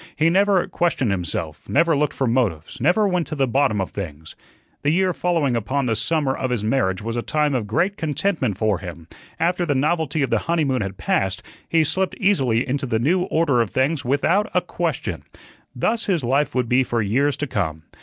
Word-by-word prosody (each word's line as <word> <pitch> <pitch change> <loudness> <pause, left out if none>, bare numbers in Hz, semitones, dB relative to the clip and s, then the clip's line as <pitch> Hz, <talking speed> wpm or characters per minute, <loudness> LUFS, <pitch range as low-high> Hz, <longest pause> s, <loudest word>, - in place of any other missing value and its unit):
He 160 +2 +3
never 195 0 +3
questioned 150 -10 0
himself, 85 -4 -4
never 165 +2 +3
looked 150 +1 0
for 135 - 0
motives, 115 - -1
never 180 - +3
went 180 -3 0
to 155 - -4
the 135 -2 +1
bottom 130 -4 +1
of 95 - -2
things. 80 -5 -7 0.5
The 145 - +1
year 185 +3 +2
following 165 -9 0
upon 130 +5 -1
the 115 -2 +1
summer 135 +4 0
of 130 - -2
his 120 -4 -1
marriage 105 -5 0
was 115 +1 -3
a 120 - -1
time 150 +2 0
of 120 -5 -1
great 180 - 0
contentment 150 - -1
for 105 -3 +1
him; 85 -3 -9 0.3
after 175 +2 +1
the 145 -5 0
novelty 155 +1 0
of 135 - -2
the - - +3
honeymoon 145 -7 +1
had 95 -1 -4
passed 95 -1 -1 0.3
he 165 -1 +3
slipped 190 +5 -1
easily 135 - +2
into 135 +1 -2
the 115 - +1
new 175 +10 +1
order 150 -9 +2
of 115 - -1
things 140 +5 0
without 165 - +1
a - - +4
question. - - -3 0.5
Thus 225 0 -1
his 175 -8 +1
life 135 +4 +1
would 125 -2 +1
be 125 +3 +3
for 120 -2 -1
years 135 +8 +1
to 145 - -2
come. 80 - -3
135 Hz, 205 wpm, -22 LUFS, 115-165 Hz, 0.5 s, a